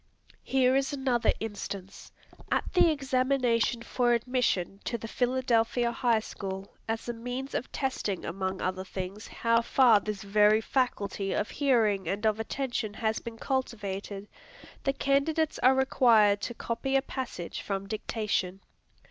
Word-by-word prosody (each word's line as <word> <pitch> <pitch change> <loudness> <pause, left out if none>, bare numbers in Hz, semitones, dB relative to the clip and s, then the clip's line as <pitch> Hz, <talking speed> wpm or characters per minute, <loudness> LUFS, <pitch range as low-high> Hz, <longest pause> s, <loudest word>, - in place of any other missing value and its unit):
Here 260 -1 +2
is 270 +2 +1
another 265 -4 +1
instance. 200 -3 -6 0.4
At - - 0
the 360 -2 +6
examination 255 -5 +1
for 240 -1 +1
admission 235 -6 0
to 235 - -1
the 225 - -7
Philadelphia 245 -1 +1
High 235 -2 +2
School, 195 -2 -6
as 225 +1 -3
a 240 - -2
means 245 +4 -5
of 250 - -3
testing 255 -8 -2
among 190 +2 -3
other 185 0 -2
things 190 +2 -6
how 230 0 +1
far 235 -2 +5
this 210 -1 -5
very 210 +2 +4
faculty 205 -5 -1
of 210 - -1
hearing 220 - +2
and 200 +5 -2
of 215 0 +2
attention 225 -2 -3
has 220 -1 0
been 230 -1 -8
cultivated, 205 -6 -3 0.6
the 275 - +2
candidates 285 +4 +1
are 260 +1 +5
required 230 -6 +4
to 240 - -4
copy 270 +5 -2
a 270 - +3
passage 255 -11 -5
from 195 -1 -3
dictation. 205 -3 -2
230 Hz, 140 wpm, -29 LUFS, 205-260 Hz, 0.6 s, the